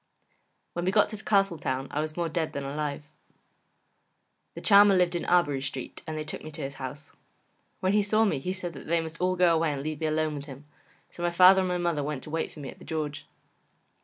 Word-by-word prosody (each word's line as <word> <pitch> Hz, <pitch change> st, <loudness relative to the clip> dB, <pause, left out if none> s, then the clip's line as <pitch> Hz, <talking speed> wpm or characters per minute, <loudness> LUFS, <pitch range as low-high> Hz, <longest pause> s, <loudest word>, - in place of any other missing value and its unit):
When 175 Hz, 0 st, -3 dB
we 185 Hz, -, +2 dB
got 210 Hz, +1 st, +4 dB
to 215 Hz, -1 st, -7 dB
Castletown 170 Hz, -11 st, +1 dB
I 150 Hz, -, -1 dB
was 155 Hz, +1 st, -5 dB
more 170 Hz, -1 st, 0 dB
dead 160 Hz, 0 st, -2 dB
than 140 Hz, -, -4 dB
alive. 145 Hz, +1 st, -4 dB, 1.5 s
The -, -, -7 dB
Charmer 200 Hz, -1 st, +7 dB
lived 180 Hz, -1 st, +3 dB
in 175 Hz, -, -2 dB
Arbory 145 Hz, -6 st, +2 dB
Street 135 Hz, -1 st, -6 dB
and 155 Hz, -1 st, -4 dB
they 155 Hz, -, -3 dB
took 155 Hz, -, -7 dB
me 155 Hz, -, -7 dB
to 155 Hz, -1 st, -5 dB
his 135 Hz, 0 st, -4 dB
house. 145 Hz, +3 st, -7 dB, 0.7 s
When 190 Hz, +1 st, +2 dB
he 210 Hz, -, +4 dB
saw 215 Hz, +2 st, +3 dB
me 155 Hz, -10 st, 0 dB
he 180 Hz, +7 st, -3 dB
said 185 Hz, -2 st, -5 dB
that 135 Hz, -, -10 dB
they 170 Hz, +1 st, +2 dB
must 165 Hz, +1 st, -6 dB
all 185 Hz, 0 st, +2 dB
go 180 Hz, -2 st, +4 dB
away 165 Hz, -1 st, +2 dB
and 140 Hz, -1 st, -5 dB
leave 155 Hz, 0 st, -4 dB
me 160 Hz, -, +1 dB
alone 155 Hz, 0 st, 0 dB
with 145 Hz, -1 st, -6 dB
him, 140 Hz, 0 st, -11 dB, 0.5 s
so -, -, -10 dB
my 175 Hz, -, +2 dB
father 185 Hz, +2 st, +7 dB
and 185 Hz, -, 0 dB
my 180 Hz, 0 st, 0 dB
mother 170 Hz, -4 st, 0 dB
went 145 Hz, -2 st, -4 dB
to 150 Hz, -, -9 dB
wait 165 Hz, 0 st, -2 dB
for 150 Hz, -, -11 dB
me 135 Hz, -, -6 dB
at -, -, -17 dB
The -, -, -13 dB
George. 150 Hz, -2 st, -4 dB
160 Hz, 240 wpm, -28 LUFS, 145-180 Hz, 1.5 s, Charmer